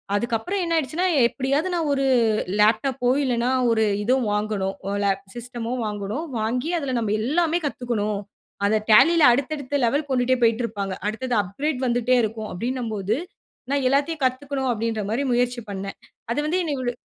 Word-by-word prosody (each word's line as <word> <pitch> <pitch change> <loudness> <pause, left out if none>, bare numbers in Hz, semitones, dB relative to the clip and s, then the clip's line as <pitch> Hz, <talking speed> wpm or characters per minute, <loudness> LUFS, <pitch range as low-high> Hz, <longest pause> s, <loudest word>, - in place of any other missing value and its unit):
அதுக்கு 230 +2 0
அப்பறம் 370 - -2
என்ன 335 0 0
ஆயிடுச்சுன்னா 320 +6 0 0.2
எப்டியாவது 280 +8 -1
நான் 320 -3 0
ஒரு 275 0 0 0.5
லேப்டாப்போ, 245 +4 +2 0.2
இல்லன்னா 245 0 +1 0.2
ஒரு 220 -1 +3 0.2
இதுதோ 255 +4 +3
வாங்கனும் 210 -2 -1 0.3
ல - - +2 0.3
சிஸ்ட்டமோ 240 0 -5
வாங்கனும். 210 +9 -4
வாங்கி 250 +9 -1
அதுல 265 -4 -2
நம்ப 210 -2 -1
எல்லாமே 335 +5 +1
கத்துக்கணும். 215 -6 -2 0.5
அத 215 - +2 0.2
டேலில 330 +9 +6
அடுத்த, 275 +4 -1
அடுத்த 285 +1 -2
லெவல் 285 +5 0
கொண்டுட்டே 255 0 +2
போயிட்டு 230 +1 +3
இருப்பாங்க. 200 -4 -4
அடுத்தது 245 +3 -2
அப்கிரேட் 265 +8 -3
வந்துட்டே 245 +1 +2
இருக்கும் 220 0 -3
அப்டின்னம் 235 +4 -3
போது 205 +5 -1 0.5
நான் 280 -2 +1
எல்லாத்தையும் 280 +2 0
கத்துக்கணும் 265 +1 -1
அப்டின்ற 225 -1 -2
மாரி 245 +6 0
முயற்சி 245 0 +1
பண்னே. 195 0 -4 0.4
அது 290 - 0
வந்து 350 +4 +1
என்னை 305 -3 -2
இவ்ளோ 245 -2 -2
245 Hz, 160 wpm, -23 LUFS, 220-280 Hz, 0.5 s, டேலில